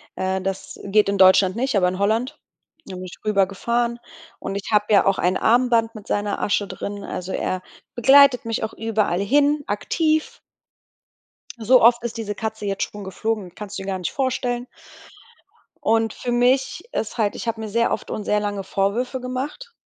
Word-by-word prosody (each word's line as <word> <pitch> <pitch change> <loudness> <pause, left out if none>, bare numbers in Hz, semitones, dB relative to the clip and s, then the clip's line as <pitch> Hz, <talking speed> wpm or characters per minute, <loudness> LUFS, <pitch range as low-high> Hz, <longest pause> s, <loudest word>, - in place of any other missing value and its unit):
Äh, 190 0 -1
das 190 0 -5
geht 205 +1 +3
in 200 0 0
Deutschland 190 0 +5
nicht, 255 +1 -1
aber 180 -2 +3
in 185 +1 -3
Holland. 230 +8 0 0.5
Da 190 - -8
bin 185 - -7
ich 180 - -10
rübergefahren 225 +4 0 0.4
und 195 - -5
ich 200 +2 -5
habe 210 -1 +3
ja 200 - +5
auch 195 -1 +2
ein 180 +1 +1
Armband 230 -1 +2
mit 210 -2 -11
seiner 205 0 -1
Asche 205 -1 0
drin. 200 0 -6
Also, 185 0 -5
er 185 - -2 0.3
begleitet 265 0 +6
mich 225 -1 -2
auch 220 - -3
überall 215 -5 0
hin 290 +7 +2
aktiv. 310 +9 -1 1.2
So 245 +3 +4
oft 235 +1 +5
ist 235 -1 -4
diese 210 -2 -4
Katze 220 0 -5
jetzt 195 -1 -2
schon 205 -1 -9
geflogen, 195 0 -3
kannst 210 -1 -7
du - - -5
dir 190 - -8
gar 190 -1 -2
nicht 180 - -3
vorstellen. 250 -2 -1 1.2
Und 225 0 +2
für 245 - -4
mich 255 - +1
ist 225 - -3
halt 210 -2 +1
ich - - -6
habe 230 - -1
mir 220 - -5
sehr 230 +3 +1
oft - - -3
und 215 - -3
sehr 210 +1 +1
lange 205 -1 -2
Vorwürfe 230 +8 -1
gemacht. 270 - -5
220 Hz, 185 wpm, -22 LUFS, 200-245 Hz, 1.2 s, begleitet